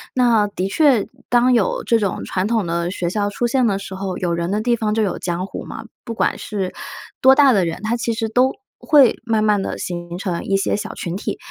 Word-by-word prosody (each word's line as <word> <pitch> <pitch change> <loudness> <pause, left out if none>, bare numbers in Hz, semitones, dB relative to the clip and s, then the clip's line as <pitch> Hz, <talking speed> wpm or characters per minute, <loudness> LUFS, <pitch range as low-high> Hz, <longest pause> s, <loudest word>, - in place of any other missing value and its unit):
那 235 -5 +3
的 190 -1 -3
确， 265 -2 +3 0.2
当 245 +1 +4
有 225 -5 +1
这 230 -1 +2
种 200 -3 -2
传 185 +2 -1
统 225 -4 0
的 170 +1 -1
学 180 -2 -2
校 205 +1 -1
出 240 +4 -2
现 255 +1 +2
的 195 - +1
时 195 -1 -8
候， 190 -1 -4
有 175 -2 -1
人 170 +1 -2
的 210 - 0
地 240 +1 +2
方 215 -2 -1
就 220 -1 +1
有 195 - -2
江 180 +1 -2
湖 - - -7
嘛， - - -8 0.2
不 230 - -5
管 - - 0
是 195 -4 -4 0.5
多 265 +1 +7
大 275 -3 +6
的 195 - +3
人， 165 +3 -4
他 225 +2 0
其 235 0 -2
实 225 0 -2
都 250 +4 +2 0.3
会 285 -6 +4
慢 220 -2 +1
慢 210 -2 +2
地 - - -4
形 175 0 -5
成 180 -3 -3
一 195 0 +1
些 195 - 0
小 210 - -5
群 170 -1 -4
体， 200 - -4
210 Hz, 255 characters per minute, -20 LUFS, 185-235 Hz, 0.5 s, 多